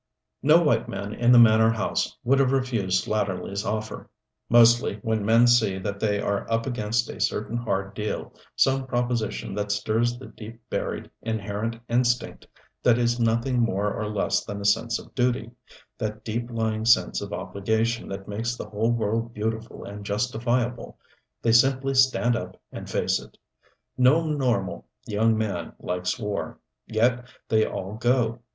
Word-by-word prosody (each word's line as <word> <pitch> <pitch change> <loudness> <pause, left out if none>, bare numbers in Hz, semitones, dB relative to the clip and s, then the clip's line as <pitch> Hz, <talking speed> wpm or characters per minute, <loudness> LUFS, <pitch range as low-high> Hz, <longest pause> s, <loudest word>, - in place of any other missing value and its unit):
No 155 +5 +5
white 150 - +1
man 100 +1 -5
in 120 +2 +3
the 125 - +8
manor 110 -1 +6
house 115 -3 -1
would 135 +3 +3
have 135 -2 +3
refused 115 -9 0
Slatterly's 100 -1 -2
offer. 110 +1 -4 0.4
Mostly, 120 -2 +5
when 110 -2 0
men 115 +3 +5
see 115 -5 +3
that 100 +1 -4
they 105 -1 +1
are 100 +2 -2
up 115 0 +1
against 115 -2 -1
a - - -7
certain 110 +2 -1
hard 100 -4 -2
deal, 105 +1 -4 0.2
some 135 0 +2
proposition 120 -5 -2
that 105 0 -2
stirs 110 +3 0
the 130 - -10
deep 115 0 -11
buried, - - -3
inherent 110 0 -3
instinct 125 +1 0 0.3
that 120 -2 +4
is 120 0 +1
nothing 115 +2 +1
more 105 -3 +1
or 105 0 -3
less 105 -2 0
than 100 0 -6
a 100 - -6
sense 115 +3 +2
of - - -13
duty 125 -1 0 0.5
that 110 -1 -4
deep 120 +2 -3
lying 110 -2 -1
sense 115 +1 +3
of - - -6
obligation 110 +4 -1
that 95 0 -7
makes 115 +4 -2
the 105 - -8
whole 110 +2 0
world 115 0 -1
beautiful 110 +1 -4
and 100 +1 -8
justifiable 120 +3 -1 0.5
they 115 - +3
simply 135 +3 +3
stand 130 -2 +3
up - - -6
and - - -8
face - - +1
it. - - -15 0.6
No 145 +6 +5
normal 125 - -1 0.2
young 110 +2 +2
man 110 -2 -3
likes 90 +4 -2
war. 105 -4 -4 0.3
Yet 120 +3 +1 0.2
they 110 -1 +3
all 95 +2 -5
go. 120 -1 +1
115 Hz, 160 wpm, -25 LUFS, 105-120 Hz, 0.6 s, the